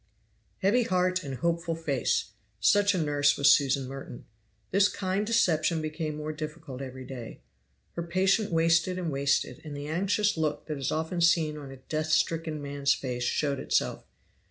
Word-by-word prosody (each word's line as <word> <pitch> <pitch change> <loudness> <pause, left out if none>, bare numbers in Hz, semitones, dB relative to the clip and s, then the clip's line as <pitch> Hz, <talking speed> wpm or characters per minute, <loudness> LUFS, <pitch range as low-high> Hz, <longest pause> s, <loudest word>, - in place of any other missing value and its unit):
Heavy 215 +6 +4
heart 185 -3 +1
and 135 -2 -5
hopeful 170 +2 -1
face! 140 - -1 0.3
such 205 - +4
a - - 0
nurse 145 -3 +2
was 140 - +6
Susan 135 -2 +3
Merton. 135 -2 -8 0.5
This 200 +2 +4
kind 195 +2 -2
deception 170 -8 +2
became 155 0 -3
more 155 0 -4
difficult 155 -3 -7
every 130 -1 -7
day. 120 - -8 0.5
Her 170 - -4
patient 190 +5 +1
wasted 165 +2 +2
and 175 -3 -2
wasted; 140 0 0
and 150 -2 -7
the 145 - -6
anxious 195 +5 +1
look 155 -2 -1
that 150 -2 -4
is 135 - -1
often 160 +3 -2
seen 165 -3 +3
on 145 -2 -8
a 135 - -10
death 155 +4 -3
stricken 155 -1 0
man's 140 0 +1
face 125 -2 -4
showed 140 +1 0
itself. - - 0
155 Hz, 165 wpm, -28 LUFS, 140-175 Hz, 0.5 s, was